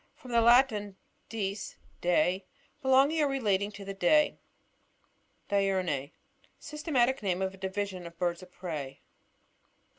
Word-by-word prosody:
— - - -42
From 250 - -10
the 235 -1 +4
Latin, 225 -5 +4 0.3
dieg, 205 -2 -2 0.4
day. 180 +2 +2 0.3
Belonging 270 +4 +4
or 295 - +3
relating 210 -7 0
to 200 -1 -9
the 195 - -5
day. 245 +11 +3 1.1
DiuRNiE. 185 -8 0 0.3
— - - -35
Systematic 275 -5 +1
name 190 -2 0
of 190 0 -2
a - - -13
division 190 -1 -4
of 170 - -11
the - - -38
birds 175 0 -1
of 185 0 -13
prey. 155 -8 -6
195 Hz, 145 wpm, -30 LUFS, 185-245 Hz, 1.1 s, the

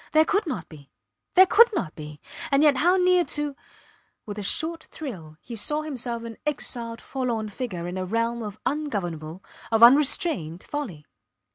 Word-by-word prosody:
There 315 0 +6
could 405 +2 0
not 265 -7 -4
be! 145 -4 -14 0.5
There 375 +1 +9
could 465 +6 +6
not 165 - -2
be! 150 -1 -9 0.3
And 275 +1 +3
yet 290 -3 +5
how 355 +6 +4
near 360 -1 +4
to... 295 -3 -3 0.7
With 210 -1 -6
a - - -3
short 320 - -2
thrill 175 - -8
he 240 - -8
saw 300 +8 0
himself 245 -6 -4
an 230 -1 -8
exiled 240 -6 -4
forlorn 235 -5 -3
figure 190 -6 -5
in 180 +1 -4
a 185 - -2
realm 230 +4 -1
of 210 -1 -7
ungovernable, 190 - -3 0.3
of 225 0 +4
unrestrained 245 - +4
folly. 210 - -6
235 Hz, 165 wpm, -25 LUFS, 190-300 Hz, 0.7 s, There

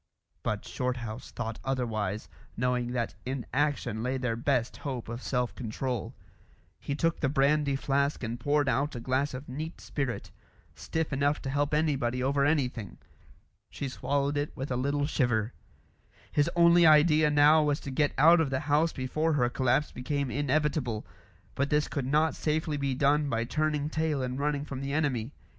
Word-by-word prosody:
But - - -2
Shorthouse 125 -2 -4
thought 115 -2 -5
otherwise, 110 -6 -2 0.3
knowing 125 0 0
that 120 -2 -1
in 130 -1 -4
action 135 -6 0
lay 130 +3 -1
their 125 -3 -1
best 120 0 0
hope 130 -5 -5
of 115 +2 -5
self 125 -2 -1
control. 125 0 -4 0.6
He 140 - -3
took 165 +2 0
the 135 - +1
brandy 140 0 +2
flask 140 +1 0
and 115 +1 -3
poured 145 +2 +1
out 140 +2 0
a - - -4
glass 130 +3 -1
of 130 +3 -8
neat 155 +6 -6
spirit, 135 -5 -4 0.4
stiff 160 -2 -3
enough 145 +2 +1
to 135 - -3
help 145 +1 0
anybody 135 -5 +1
over 140 +1 +2
anything. 130 -8 0 0.7
She 140 - -5
swallowed 140 +2 -1
it 145 +1 -3
with 135 +1 -4
a - - +1
little 140 +3 0
shiver. 120 -6 0 0.8
His 145 -1 +2
only 170 0 +6
idea 155 -1 +6
now 150 +2 +6
was 150 -1 +1
to 140 - -6
get 145 +2 +2
out 165 +4 +7
of 155 - 0
the 130 0 -1
house 150 +3 +2
before 155 +5 -1
her 125 -4 +2
collapse 130 +3 +1
became 140 +1 -2
inevitable; 145 -5 0 0.5
but 140 +1 -1
this 150 -1 +2
could 135 -3 -3
not 155 +3 +2
safely 155 0 -1
be 140 -2 -1
done 145 +2 +2
by 115 -2 0
turning 150 +3 0
tail 155 -3 -1
and 125 +1 -3
running 145 0 -1
from 135 -2 -6
the 140 0 -3
enemy. 140 -6 0
140 Hz, 170 wpm, -29 LUFS, 125-150 Hz, 0.8 s, out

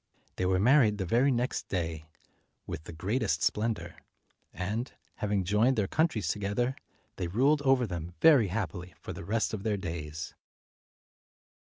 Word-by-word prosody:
They 90 - +1
were 95 0 +3
married 110 0 +5
the 95 - -2
very 120 +10 +3
next 125 -1 -1
day, 80 -4 -3 0.6
with 80 - -6
the - - -7
greatest 85 0 -1
splendor; 110 0 -1 0.5
and, 105 +8 -3 0.3
having 105 -2 0
joined 105 +8 +3
their 105 - +1
countries 130 - +1
together, 105 +6 -1 0.4
they 90 - -2
ruled 135 - +3
over 135 -3 +3
them 85 -3 -6
very 145 -10 +6
happily 90 -2 -4
for - - -7
the - - -8
rest 110 +6 0
of 105 - -3
their 105 -1 0
days. 80 -4 -5
105 Hz, 150 wpm, -30 LUFS, 90-120 Hz, 0.6 s, very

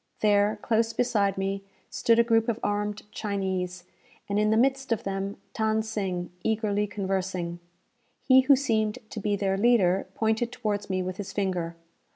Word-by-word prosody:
There, 210 0 +3
close 230 0 +1
beside 205 -6 +1
me, 195 +1 -2 0.3
stood 230 -1 +3
a 235 - +6
group 225 0 +2
of 230 0 -1
armed 205 0 -1
Chinese, 190 -3 -3 0.4
and, 205 +1 0
in 210 0 +3
the 220 - +3
midst 270 +1 +1
of 225 - 0
them, 195 0 -3 0.2
Than 220 0 +1
Sing, 190 -5 -3
eagerly 210 -2 0
conversing. 190 -3 -3 0.6
He 260 -1 +6
who 275 +2 +6
seemed 220 -5 0
to - - -5
be 205 0 0
their 195 -1 0
leader, 195 -5 +3
pointed 220 +2 0
towards 210 -5 -3
me 185 -1 0
with 185 0 -4
his 205 - -5
finger. 180 -4 -2
205 Hz, 165 wpm, -27 LUFS, 195-225 Hz, 0.6 s, a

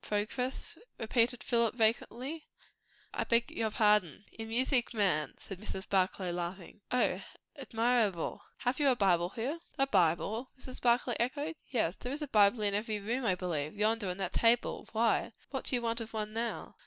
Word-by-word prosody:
"Progress?" 225 +5 -2 0.2
repeated 235 +1 +1
Philip 235 -2 +2
vacantly. 245 +6 0 0.7
"I - - 0
beg 235 0 +2
your 225 -1 -1
pardon!" 210 -4 +2
"In 225 0 -7
music, 245 +1 +1
man!" 170 -9 +1
said 195 - -9
Mrs. 190 -2 -6
Barclay, 185 -1 +1
laughing. 175 +3 -5
"O! 250 - +2 0.3
Admirable. 230 - 0 0.2
Have 250 +2 0
you 285 -2 +4
a 255 - +4
Bible 180 -5 +3
here?" 260 - -3 0.2
"A 270 - +4
Bible?" 195 - +1
Mrs. 255 -1 -8
Barclay 245 0 +3
echoed. 285 +6 -1 0.2
"Yes 210 -8 0
there 250 - -5
is 295 +2 -3
a - - -4
Bible 210 -1 +4
in 205 -1 +2
every 210 +1 -1
room, 235 +5 -2
I 190 -4 +3
believe. 165 -4 -3
Yonder, 215 -1 +1
on 180 - -3
that 190 -2 -3
table. 230 +1 +2
Why? 225 +1 +1 0.2
what - - -3
do 265 - +2
you 240 - -1
want 230 0 +1
of 225 0 -7
one 215 -1 -3
now?" 230 +1 -3
225 Hz, 175 wpm, -32 LUFS, 200-245 Hz, 0.7 s, you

